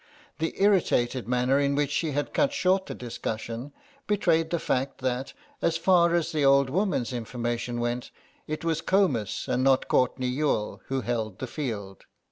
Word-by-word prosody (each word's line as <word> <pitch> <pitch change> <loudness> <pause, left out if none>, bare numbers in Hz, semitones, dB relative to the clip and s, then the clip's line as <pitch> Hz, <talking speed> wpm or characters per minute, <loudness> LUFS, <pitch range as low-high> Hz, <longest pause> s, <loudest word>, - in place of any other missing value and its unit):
The 160 +1 -2
irritated 150 - +2
manner 125 +2 +2
in 140 0 +1
which 145 0 0
she 155 0 -1
had 145 +1 -2
cut 285 -1 +2
short 190 -7 +2
the - - -5
discussion 115 +2 -5 0.4
betrayed 170 -6 +2
the 170 - 0
fact, 135 -3 -1
that, 130 +1 -2 0.3
as 165 -1 +1
far 170 -1 +4
as 170 -2 0
the 155 -2 0
old 140 -1 +5
woman's 175 - 0
information 120 0 -3
went, 120 +1 -2 0.4
it 155 +2 -4
was 165 -1 0
Comus 155 - +1
and 125 +1 +1
not 135 -1 +3
Courtenay 125 0 +1
Youghal 125 -4 -1
who 135 0 -1
held 110 -5 -2
the - - -4
field. 110 -9 -5
135 Hz, 165 wpm, -27 LUFS, 120-165 Hz, 0.4 s, old